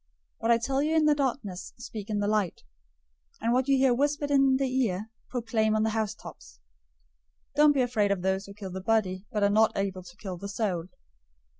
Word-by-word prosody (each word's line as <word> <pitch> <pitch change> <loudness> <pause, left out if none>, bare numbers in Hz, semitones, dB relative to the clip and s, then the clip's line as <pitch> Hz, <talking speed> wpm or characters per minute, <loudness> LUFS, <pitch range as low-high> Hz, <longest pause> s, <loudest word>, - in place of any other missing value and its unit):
010:027 - - -50 0.3
What 225 +1 +2
I - - +4
tell 265 +4 -1
you 310 +2 +1
in 315 -1 +4
the 300 - +5
darkness, 235 -10 -3
speak 225 -3 -8
in 210 - -1
the 205 0 0
light; 210 -4 0 0.8
and 230 +2 +1
what 255 +1 +2
you 275 -1 +4
hear 265 -1 +4
whispered 290 +2 0
in 270 -1 +4
the 270 0 +1 0.2
ear, 210 +1 -3 0.2
proclaim 225 -3 0
on 215 - +2
the 220 - +1
housetops. 215 - -5 0.9
010:028 - - -45
Don't 300 0 +6
be 275 - +2
afraid 215 -5 +1
of 190 -3 -1
those 190 +1 0
who 200 - -11
kill 195 -2 -7
the 190 +1 -5
body, 195 -2 0
but 210 -3 0
are 200 - +4
not 220 +1 +3
able 195 -2 -2
to 175 +1 -14
kill 190 -4 -6
the 200 +3 -7
soul. 195 -5 -1
220 Hz, 215 wpm, -28 LUFS, 195-260 Hz, 0.9 s, Don't